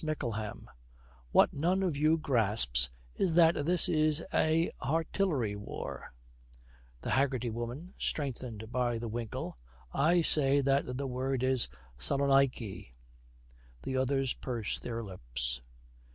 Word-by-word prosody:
MICKLEHAM. 120 -9 -4 0.6
'What - - +4
none 180 +6 +1
of 175 -6 0
you 155 +3 +3
grasps 105 - +2 0.2
is 175 -4 0
that 165 -1 +6
this 180 0 +6
is 155 -2 +2
a 160 +2 +2
artillery 150 - 0
war 100 -10 -7 0.4
' - - -28
THE - - -2
HAGGERTY 130 -3 +1
WOMAN, 120 - -6
strengthened 120 -6 -3
by 120 -1 0
the 115 +1 -5
winkle, 115 0 -5 0.4
'I 170 +4 +3
say 140 -3 +5
that 135 -2 0
the 140 - -3
word 130 0 -2
is 130 - +2 0.3
Salonaiky.' 135 - +1 1.0
The 130 - -3
others 130 0 +1
purse 120 -5 -3
their 115 -1 -5
lips. 60 - -4
130 Hz, 125 wpm, -31 LUFS, 110-150 Hz, 1.0 s, that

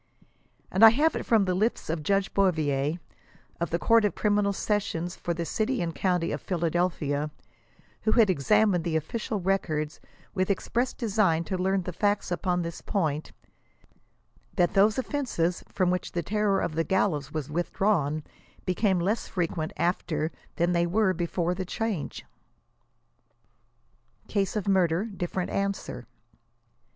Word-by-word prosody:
And 190 - +3
I 225 - +13
have 295 +8 +2
it - - -4
from 220 -4 +4
the 185 - 0
lips 215 +6 0
of 160 0 -2
Judge 195 +4 0
Bouvier, 155 -5 +1 0.6
of 170 -2 -1
the 170 - 0
Court 230 +5 +4
of 210 - +1
Criminal 205 -1 +2
Sessions 195 -4 -2
for 175 - -4
the 170 0 -3
City 230 +8 -1
and 170 -1 -2
County 180 -2 0
of 145 - -3
Phila 170 -3 -1
delphia, 155 -4 0 0.7
who 220 - +2
had 230 -3 +5
examined 190 +2 +3
the 165 -2 -1
ofBcial 200 - -2
records 155 -6 -1 0.3
with 185 -1 0
express 235 +5 0
design 200 -8 +1
to 190 - -3
learn 190 +1 +1
the 180 - -5
facts 205 +2 0
upon 180 0 0
this 170 0 -6
point, 155 -6 -1 1.2
that 175 -1 +2
those 210 +4 +4
offenses 245 - -1
from 185 -2 +1
which 180 -1 -2
the 170 - -1
terror 205 +2 +1
of 155 - -2
the 165 +1 +1
gallows 155 -5 0
was 150 -2 -4
withdrawn, 165 -3 0 0.4
became 190 0 +1
less 205 +6 0
frequent 165 -1 -2
after 160 -3 0 0.2
than 175 +1 +1
they 170 0 +2
were 195 +1 +2
before 175 0 -1
the 185 +1 -3
change. 205 -3 -3 2.0
"CASE 200 -1 -1
OF 210 -2 -2
MURDER 185 -1 +2
DIFFERENT." 180 +1 -3
ANSWER. 195 - -3
180 Hz, 150 wpm, -27 LUFS, 165-205 Hz, 2.0 s, I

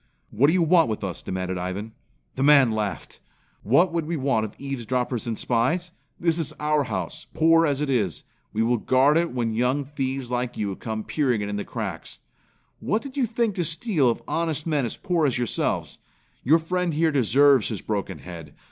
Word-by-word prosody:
"What 125 +7 +3
do 160 - +3
you 180 -2 +3
want 165 -4 +4
with 110 -1 -3
us?" 95 -3 -4
demanded 95 0 -3
Ivan. 95 +5 -4 0.4
The 130 - -3
man 140 -4 +6
laughed. 105 -3 -4 0.4
"What 165 - +3
would 165 -2 -1
we 170 0 -2
want 135 -5 +1
of 105 - -9
eavesdroppers 125 -3 -3
and 115 -2 -2
spies? 145 +10 0 0.3
This 170 -1 +1
is 160 - -3
our 150 -1 +1
house, 155 +4 -5
poor 165 +1 +5
as 140 -1 -1
it 150 - -1
is. 105 - 0 0.3
We 110 - 0
will 120 +1 +2
guard 130 +6 +3
it 170 +1 +1
when 120 -3 -1
young 125 +5 0
thieves 135 -3 -4
like 125 0 -2
you 100 -2 -2
come 110 +1 -5
peering 125 -7 0
in 105 0 -3
the 105 - -2
cracks. - - -6 0.6
What 215 +4 -1
did 275 -2 -9
you 265 -4 +1
think 225 -1 0
to 180 - -1
steal 165 - +1
of 115 - -2
honest 160 -3 -1
men 150 -6 0
as - - -5
poor 175 -6 +1
as 130 - 0
yourselves? 120 -1 -2 0.4
Your 155 +6 +5
friend 175 0 -1
here 160 +1 +2
deserves 135 -1 +4
his 110 -4 -4
broken 100 -3 -3
head. 80 -5 -10
135 Hz, 195 wpm, -24 LUFS, 110-160 Hz, 0.6 s, man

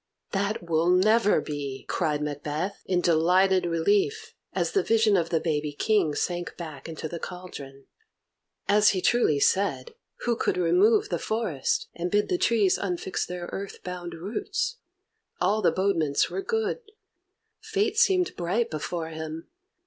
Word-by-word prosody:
"That 200 0 -1
will 165 +1 +2
never 210 +4 +4
be!" 140 -3 -5
cried 150 -4 -1
Macbeth, 150 +6 -3
in 180 -1 +1
delighted 180 +3 +3
relief, 200 - +1 0.2
as - - -1
the 395 - +2
vision 225 - +3
of 170 -3 +1
the 165 - +1
baby 150 -2 -1
King 175 -2 +1
sank 175 -1 -3
back 155 -3 -8
into 160 0 -5
the 170 +2 -6
cauldron. 145 -8 -9 0.8
As 210 +1 +5
he - - -1
truly 235 -12 +3
said, 200 - +1 0.3
who 240 -1 +1
could - - 0
remove 180 +6 +3
the 175 - -1
forest, 210 - -1
and 175 +1 -3
bid 205 +2 +1
the 360 - 0
trees 215 - +3
unfix 185 -1 -2
their 180 -1 -5
earth 200 0 -6
bound 175 -2 -6
roots? 405 - -3 0.6
All 205 +4 +2
the - - +4
bodements 170 -7 +1
were 390 - -2
good. 445 +2 -1 0.8
Fate 435 0 0
seemed 380 -6 +3
bright 185 +7 -1
before 160 +1 -4
him. 160 0 -7
180 Hz, 150 wpm, -26 LUFS, 160-215 Hz, 0.8 s, As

